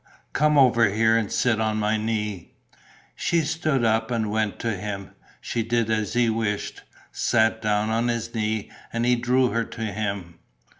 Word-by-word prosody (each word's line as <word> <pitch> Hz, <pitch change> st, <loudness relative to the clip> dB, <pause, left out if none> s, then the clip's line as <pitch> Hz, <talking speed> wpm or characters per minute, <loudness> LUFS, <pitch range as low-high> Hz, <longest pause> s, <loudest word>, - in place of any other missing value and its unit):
"Come 150 Hz, +1 st, +3 dB
over 120 Hz, -5 st, +5 dB
here 110 Hz, +2 st, +3 dB
and 110 Hz, -3 st, 0 dB
sit 110 Hz, -3 st, +1 dB
on 110 Hz, -1 st, 0 dB
my 105 Hz, +1 st, +1 dB
knee." 105 Hz, -4 st, -3 dB, 0.6 s
She 170 Hz, -, +1 dB
stood 155 Hz, -5 st, 0 dB
up 110 Hz, 0 st, +1 dB
and 110 Hz, -3 st, -1 dB
went 110 Hz, -1 st, -1 dB
to 115 Hz, -2 st, -1 dB
him. 100 Hz, 0 st, -6 dB, 0.3 s
She 120 Hz, -, -2 dB
did 115 Hz, 0 st, 0 dB
as 110 Hz, -2 st, -1 dB
he 120 Hz, -1 st, +3 dB
wished, 110 Hz, -2 st, -2 dB, 0.3 s
sat 110 Hz, -1 st, +1 dB
down 105 Hz, 0 st, +1 dB
on 115 Hz, +2 st, +1 dB
his 115 Hz, -1 st, -2 dB
knee; 110 Hz, -2 st, -2 dB, 0.2 s
and 115 Hz, +1 st, -1 dB
he 125 Hz, 0 st, +4 dB
drew 125 Hz, +1 st, +2 dB
her 115 Hz, 0 st, 0 dB
to 115 Hz, -, -9 dB
him. 100 Hz, -5 st, -4 dB
110 Hz, 170 wpm, -24 LUFS, 105-120 Hz, 0.6 s, over